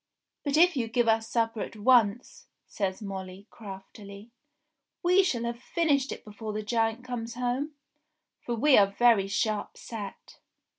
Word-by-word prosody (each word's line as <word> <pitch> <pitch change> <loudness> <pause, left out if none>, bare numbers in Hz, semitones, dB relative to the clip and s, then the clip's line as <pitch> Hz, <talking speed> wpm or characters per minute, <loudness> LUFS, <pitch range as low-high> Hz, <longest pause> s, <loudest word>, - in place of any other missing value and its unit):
"But 285 0 0
if 350 +1 +5
you 240 -4 -1
give 240 +1 +1
us 225 0 +2
supper 225 -2 0
at - - -6
once," 230 0 +2 0.2
says 195 +1 -3
Molly 190 -1 -7
craftily, 200 +1 -11 0.7
"we 360 +2 +5
shall 255 -11 -1
have 235 0 -4
finished 285 -4 +1
it - - -8
before 215 0 -7
the 215 0 -3
giant 225 +1 0
comes 235 -2 -5
home; 250 +5 -2 0.6
for 240 - -3
we 265 +3 +5
are 200 - +5
very 230 -5 +5
sharp 215 +1 -2
set." 210 -4 -9
230 Hz, 150 wpm, -28 LUFS, 210-250 Hz, 0.7 s, if